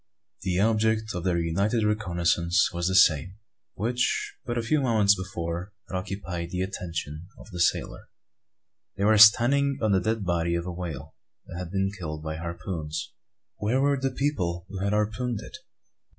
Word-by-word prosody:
The 90 -1 -1
object 110 +1 +1
of 90 -2 -4
their 90 -2 +2
united 100 +7 0
reconnoissance 85 -5 +1
was 85 0 -1
the 95 - 0
same 85 0 +4 0.4
which, 120 +4 -1
but 120 -1 -2
a 115 - 0
few 145 +6 +1
moments 110 -6 +4
before, 90 0 -5
had - - -6
occupied 95 -3 -4
the 90 +1 -2
attention 85 -4 -5
of - - -14
the 90 - -6
sailor. 85 - 0 0.9
They 100 - -1
were 110 0 +5
standing 135 +6 +6
on 110 -2 +1
the 95 -1 +3
dead 110 -2 -1
body 85 -1 0
of 85 0 -2
a 90 - -4
whale 80 -5 -6 0.3
that 85 - -8
had 90 -2 -5
been 95 +1 0
killed 80 -5 -6
by 80 0 -4
harpoons. 85 -2 -5 0.5
Where 110 +6 0
were 140 +1 +3
the 135 0 -1
people 90 - -2
who 95 -1 -6
had 100 +1 0
harpooned 110 +2 -1
it? - - -10
95 Hz, 170 wpm, -26 LUFS, 85-110 Hz, 0.9 s, standing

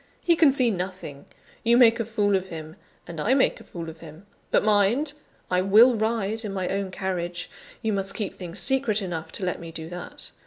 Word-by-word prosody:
He 340 - +4
can 320 -3 +6
see 255 -3 +3
nothing; 185 -7 -6 0.4
you 235 +1 +4
make 235 -2 +6
a 230 - -1
fool 205 -3 +1
of 190 0 -1
him, 160 -2 -8 0.3
and 165 -3 -6
I 240 - +3
make 270 - +2
a - - -13
fool 170 -2 -8
of 160 0 -9
him. 160 +3 -12 0.2
But - - +3
mind! 215 +8 +3 0.4
I 180 0 +3
will 215 +6 +6
ride 220 0 -1
in 205 -2 -4
my 185 -1 -2
own 195 0 -2
carriage: 175 -2 -4 0.3
you 220 -1 0
must 195 0 -2
keep 210 -4 -3
things 175 0 -8
secret 235 -2 +1
enough 165 -4 -5
to 190 - -3
let 180 - -2
me 165 -1 -8
do 160 0 -7
that. 180 0 -7
195 Hz, 210 wpm, -25 LUFS, 175-225 Hz, 0.4 s, can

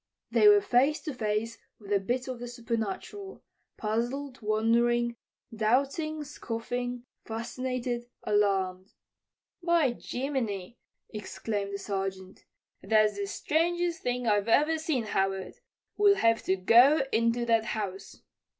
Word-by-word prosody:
They 420 - +5
were 415 0 +7
face 275 +1 +2
to 300 - -5
face 220 -1 -2 0.2
with 205 -1 -5
a 200 - +4
bit 245 +7 -2
of 255 -2 -5
the 245 - -6
supernatural, 235 - -5 0.3
puzzled, 245 +5 -3
wondering, 235 +2 +2 0.4
doubting, 280 +8 0
scoffing, 245 -2 -4 0.2
fascinated, 240 +1 -4 0.2
alarmed. 195 -2 0 0.7
"By 340 -6 +3
Jiminy!" 240 -6 -4 0.3
exclaimed 200 -1 -4
the - - -2
Sergeant. 195 -1 -5 0.4
"That's 215 -1 +3
the 200 0 -3
strangest 340 - 0
thing 250 0 -2
I've 205 -2 +2
ever 305 +7 +3
seen, 310 -6 -1
Howard. 195 -2 -2 0.4
We'll 410 -1 +6
have 230 -8 +3
to 190 - +2
go 240 +10 +6
into 230 +1 +1
that 225 -1 +2
house." 205 -3 -5
235 Hz, 120 wpm, -29 LUFS, 210-265 Hz, 0.7 s, were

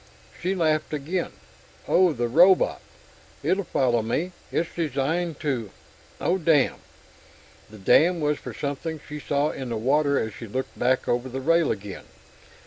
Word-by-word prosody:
She 185 +2 0
laughed 155 -3 +1
again. 165 +5 -3 0.6
"Oh, 180 -1 +4
the 120 -5 -1
robot? 180 +9 +4 0.6
It'll 195 +2 +1
follow 125 -8 +1
me. 150 +11 -2 0.2
It's 165 - -1
designed 160 +1 -1
to.... 125 -8 -2 0.5
Oh 185 +2 +1
damn!" 155 -5 +3 0.9
The 110 - -12
damn 165 - +4
was 150 -1 0
for - - -7
something 150 +3 -4
she 150 0 -6
saw 145 +1 0
in 130 -2 -6
the 115 - -2
water 140 +4 +2
as 110 -2 -2
she 115 - -9
looked 130 +5 -5
back 130 +1 +1
over 120 +2 0
the 130 +1 -4
rail 165 +3 +3
again. 100 0 -6
145 Hz, 150 wpm, -25 LUFS, 125-165 Hz, 0.9 s, Oh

